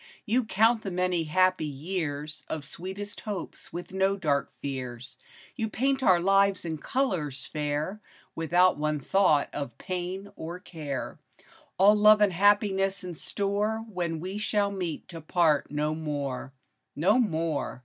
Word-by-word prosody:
You 240 +2 +2
count 225 +2 +3
the 200 - -4
many 180 -2 0
happy 185 +3 +3
years 150 0 -3
Of 155 -2 -4
sweetest 195 +7 -7
hopes 205 -5 -6
with 175 +1 -7
no 190 +1 +2
dark 145 -7 0
fears; 130 -2 -6 0.4
You 225 -4 -2
paint 270 +4 0
our 185 -8 +5
lives 195 +1 +3
in 160 -2 -3
colors 170 - -1
fair, 150 +7 -3 0.3
Without 175 +2 +3
one 150 0 0
thought 155 -2 +3
of 140 -5 -5
pain 185 +2 -4
or 170 +2 -6
care; 150 -7 -6 0.6
All 200 +3 +7
love 210 0 +7
and 205 -3 +4
happiness 195 0 +3
in 180 -1 -5
store 205 +6 -2
When 170 -3 -2
we 190 +5 -4
shall 205 -1 +1
meet 180 -5 -4
to 165 -2 -8
part 155 -2 +2
no 150 +1 -1
more, 145 -4 -4 0.4
No 195 - +3
more 165 - -1
180 Hz, 145 wpm, -28 LUFS, 155-200 Hz, 0.6 s, All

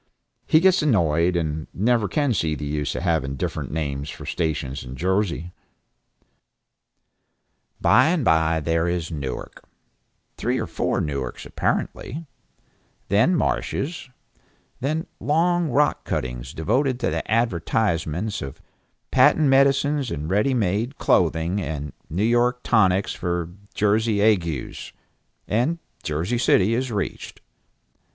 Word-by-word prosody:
He 155 - +5
gets 190 +1 +4
annoyed, 85 - +2
and 80 -2 -2
never 110 +1 +2
can 145 -1 +1
see 80 -6 0
the 75 - -5
use 75 0 -2
of - - -3
having 80 -6 0
different - - -3
names 70 -2 -3
for 80 -1 -8
stations 75 -5 -2
in 65 +1 -8
Jersey. 90 +1 -1 2.3
By 130 +4 +5
and 160 -5 +1
by 80 0 +3
there 80 +2 +1
is 85 -1 -2
Newark, 70 -5 -6 0.7
three - - 0
or - - -1
four - - -1
Newarks 70 -5 -4
apparently; 160 +6 -2 0.8
then 110 - +4
marshes; 160 -2 -2 0.7
then 155 +5 -1
long 170 +2 +2
rock 145 +4 +2
cuttings 60 +1 -4
devoted 125 - +1
to - - +1
the - - -3
advertisements 100 -3 0
of 70 -1 -7 0.5
patent 155 -3 +5
medicines 140 0 +3
and 75 0 -4
ready 105 +7 +2
made, 110 +5 0
clothing, 85 +3 +2
and 75 -5 -4 0.2
New 90 +6 -1
York 120 +2 +2
tonics 95 -4 +3
for 85 -1 -3 0.2
Jersey 105 +1 +2
agues, 90 - 0 0.5
and 125 +10 +1 0.2
Jersey 85 +10 -1
City 105 -3 +3
is 125 +1 -1
reached. 100 -3 -4
95 Hz, 120 wpm, -23 LUFS, 80-125 Hz, 2.3 s, He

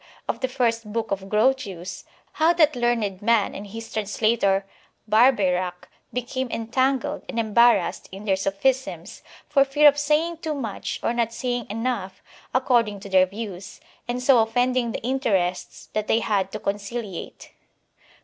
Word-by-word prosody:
of - - -2
the 260 - 0
first 230 -4 -1
book 225 0 -3
of 195 0 -3
Grotius, 210 -6 0 0.3
how 320 +2 +3
that 310 -4 +3
learned 230 -5 0
man 225 -1 +2
and 205 - -7
his 225 +3 -9
translator 205 -2 +1 0.4
Barbeyrac 190 -6 +2 0.2
became 250 +1 -3
en 225 -1 -4
tangled 260 +1 0
and 235 - -5
embarrassed 235 +2 +3
in 195 +2 -9
their 195 -2 +2
sophisms, 225 +8 -1 0.3
for 275 -2 +4
fear 290 +2 +4
of 290 0 +5
saying 305 +3 +1
too 320 -2 -3
much 225 -8 -4
or 230 - +1
not 235 -1 0
saying 245 -1 -3
enough 215 -4 -3 0.3
according 235 -5 +2
to 200 - -9
their 185 -1 +5
views, 195 -2 -8 0.3
and 245 +1 -3
so 255 -2 +6
offending 245 +2 +1
the - - -6
interests 205 -9 -1
that 215 0 -2
they 225 - +2
had 195 -2 0
to - - -4
conciliate. 205 -1 -5
230 Hz, 150 wpm, -24 LUFS, 200-255 Hz, 0.4 s, so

